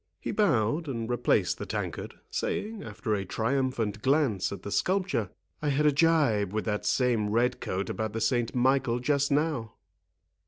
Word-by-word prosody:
He - - -4
bowed, 150 - +1
and 115 -5 -3
replaced 120 0 +1
the - - -5
tankard, - - -4 0.2
saying, 215 0 -2
after 110 -6 -3
a 100 -2 0
triumphant 115 0 -1
glance 135 - +2
at 100 -2 -7
the 100 - -5
sculpture, 185 - 0 0.3
"I 150 - 0
had 145 +2 +2
a 150 - +6
gibe 140 - +3
with 110 - -1
that 105 -2 -1
same 120 -5 +2
red 120 +4 +1
coat 95 +1 -2
about 110 -1 -3
the 115 - -2
Saint 120 +1 0
Michael 130 -1 +2
just 140 +2 +1
now." 140 -6 0
120 Hz, 165 wpm, -28 LUFS, 110-145 Hz, 0.3 s, a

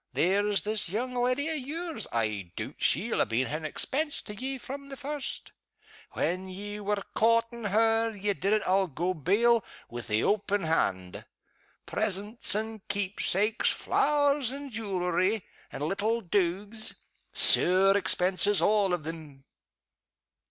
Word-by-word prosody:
There's 200 +3 +1
this 210 -3 -1
young 245 +7 -3
leddy 250 +4 0
o' 320 - -1
yours, 315 +4 -3
I 105 -6 -2
doot - - -6
she'll - - +2
ha' - - -7
been 120 +3 +1
an 155 +4 -4
expense 285 - -2
to 210 - -8
ye 265 +5 -4
from 275 +2 -8
the 275 - -8
first. 290 0 -4 0.6
When 185 +2 -2
you 205 +2 -7
were 205 -1 -1
coortin' 230 +1 +1
her, 225 +2 +2
ye 205 -1 -2
did 195 +1 -2
it, 215 -1 +2
I'll 190 +1 +2
go 175 +4 -2
bail, 210 - +2 0.3
wi' 120 0 -5
the 110 -2 -1
open 205 -1 0
hand. 95 - -1 0.6
Presents 210 +2 -1
and 220 0 -4
keep 200 -1 -2
sakes, 210 +4 +3
flowers 285 -3 +1
and 280 0 -7
jewelery, 190 -1 -1 0.3
and 145 - -5
little 210 +8 -1
dogues. 200 +4 -2 0.4
Sair 190 +2 +6
expenses 195 +1 +4
all 205 -3 +3
of 170 - -9
them!" 155 -4 -8
205 Hz, 140 wpm, -28 LUFS, 180-230 Hz, 0.6 s, Sair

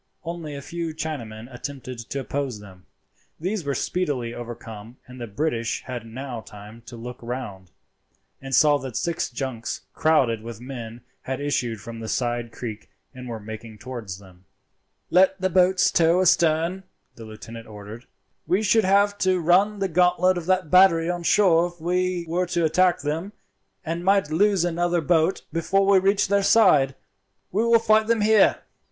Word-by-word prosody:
Only 165 -3 -6
a 140 - -7
few 170 0 -5
Chinamen 120 -9 -6
attempted 130 -1 -7
to 140 - -3
oppose 135 -5 -3
them. 95 -3 -15 0.5
These 185 +3 -2
were 140 -1 -2
speedily 140 -10 -2
overcome, 115 -1 -9
and 125 0 -12
the 120 - -5
British 115 0 -2
had 120 -3 -7
now 125 0 -6
time 105 +2 -13
to 120 - -9
look 120 +2 -8
round, 115 -7 -6 0.7
and 135 -1 -2
saw 145 -2 +5
that 130 -3 -6
six 170 -2 -2
junks 120 -3 -5
crowded 135 -8 +2
with 115 -1 -8
men 120 -2 -8 0.2
had 130 0 -4
issued 120 -7 -2
from 115 +2 -8
the 110 - -6
side 120 -1 -2
creek 115 -2 -7 0.2
and 125 -1 -9
were 115 -2 -5
making 110 +1 -9
towards 115 -5 -7
them. 95 -2 -18 0.7
"Let 190 +1 +4
the 185 0 0
boats 185 +1 +4
tow 170 +1 +3
astern," 170 0 +2 0.3
the 115 - -11
lieutenant 115 +1 -10
ordered. 105 +3 -10 0.4
"We 185 +6 +1
should 215 +1 +3
have 200 +1 +3
to 185 -1 +2
run 190 +5 +3
the 195 -1 0
gauntlet 180 +1 +3
of 175 -1 -5
that 185 -4 +1
battery 175 -2 +5
on 175 0 -4
shore 170 -2 +4
if 175 0 -14
we 180 +1 -1
were 180 +2 -1
to 170 -1 0
attack 180 +3 +2
them, 165 +7 -3 0.5
and 165 +2 -3
might 195 -4 +2
lose 195 +1 +3
another 175 0 0
boat 165 +2 +1
before 195 +4 +1
we 195 -1 +5
reached 195 +1 +2
their 200 0 +3
side. 150 -10 +4 0.6
We 210 +5 +1
will 235 0 +5
fight 220 -1 +3
them 230 -1 +2
here." 215 -1 +4
155 Hz, 170 wpm, -24 LUFS, 120-180 Hz, 0.7 s, saw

